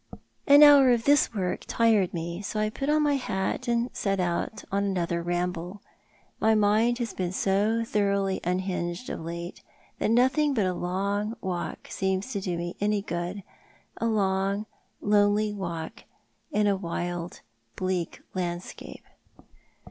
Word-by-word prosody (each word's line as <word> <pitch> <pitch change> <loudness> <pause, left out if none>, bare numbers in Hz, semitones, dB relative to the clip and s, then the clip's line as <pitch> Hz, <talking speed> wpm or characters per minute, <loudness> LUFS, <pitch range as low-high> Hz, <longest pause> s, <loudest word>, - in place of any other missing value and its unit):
An 285 +1 +9
hour 285 -3 +8
of 240 -2 +3
this 285 +2 +4
work 190 -5 -2
tired 220 -5 +3
me, 170 +2 -4
so 210 +1 -3
I 215 0 0
put 275 +5 -3
on 305 0 +3
my 290 -1 +2
hat 190 -6 -2
and 235 +1 0
set 195 -1 -1
out 175 +4 -2
on 200 +1 +1
another 175 -3 -1
ramble. 175 +2 -3 0.6
My 220 0 +4
mind 215 +3 +3
has 235 -3 -3
been 180 -2 -2
so 205 +4 +1
thoroughly 200 -3 0
unhinged 180 +3 -2
of - - -4
late 170 +2 -6 0.4
that - - +1
nothing 260 +5 +3
but 210 -5 +2
a 185 - 0
long 200 +5 -2
walk 180 -2 -4
seems 190 +4 -1
to 200 -5 -2
do 180 -2 -2
me 175 +1 -4
any 205 -1 +1
good 175 +2 -4 0.3
— - - -33
a 230 - +2
long, 200 -1 0 0.4
lonely 205 0 +3
walk 170 -5 -6 0.5
in 210 -7 +2
a 200 -1 +3
wild, 175 -1 -4 0.3
bleak 185 -2 -2
landscape. 175 -1 -5
195 Hz, 150 wpm, -27 LUFS, 180-220 Hz, 0.6 s, An